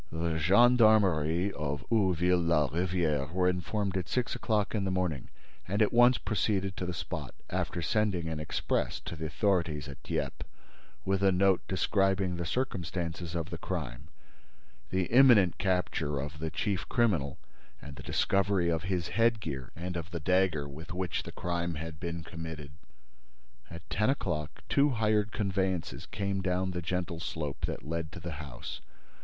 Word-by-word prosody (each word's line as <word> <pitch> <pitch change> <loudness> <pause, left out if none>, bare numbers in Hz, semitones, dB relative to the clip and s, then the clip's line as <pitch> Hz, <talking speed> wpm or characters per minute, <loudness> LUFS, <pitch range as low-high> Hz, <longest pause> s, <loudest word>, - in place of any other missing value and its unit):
The 80 0 -1
gendarmerie 100 -3 +4
of 70 -4 -3
Ouville 90 -4 +3
la 75 -4 +3
Rivière 80 -4 0
were 90 +1 +2
informed 95 +2 -1
at 90 -2 -2
six 125 -2 0
o'clock 105 -2 0
in 105 -3 0
the 95 - 0
morning 90 -7 -1 0.4
and 100 +3 -1
at 105 +1 +3
once 120 +1 +6
proceeded 100 -3 0
to 90 - -3
the - - -1
spot, - - -5 0.2
after 85 - -2
sending 95 -2 +1
an 80 -1 -3
express 75 - -1
to - - -6
the 80 0 -4
authorities 80 -4 0
at 70 -3 -9
Dieppe - - -3 0.6
with 95 0 +1
a 100 -1 +5
note 95 0 +3
describing 95 -1 +1
the 85 -1 -3
circumstances 85 -7 -3
of 85 +1 -3
the 85 - -5
crime, 70 -10 -4 0.8
the 95 0 +1
imminent 115 -4 +6
capture 90 -6 0
of 75 +3 -5
the 80 +1 -2
chief 95 +4 -2
criminal 85 - +1 0.4
and 70 -1 -9
"the 65 - -9
discovery 95 +2 +1
of 80 -1 +1
his 90 -3 -1
headgear 105 - 0
and 90 +2 -5
of 85 -1 -4
the 85 -1 -4
dagger 90 -3 +2
with 80 +8 -8
which 90 -2 -1
the - - -8
crime 85 -1 -2
had 80 0 -6
been 85 -1 -4
committed." 80 -3 -7 1.0
At 85 +1 -10
ten 105 +4 +2
o'clock, 80 - -2
two 145 +1 +4
hired 110 -3 +1
conveyances 95 -5 -1
came 100 -1 -2
down 95 0 0
the 90 -1 -3
gentle 85 -1 -2
slope 75 -4 -3
that - - -6
led 80 -1 -3
to - - -7
the 85 - -5
house. 70 -4 -7
90 Hz, 160 wpm, -30 LUFS, 80-100 Hz, 1.0 s, once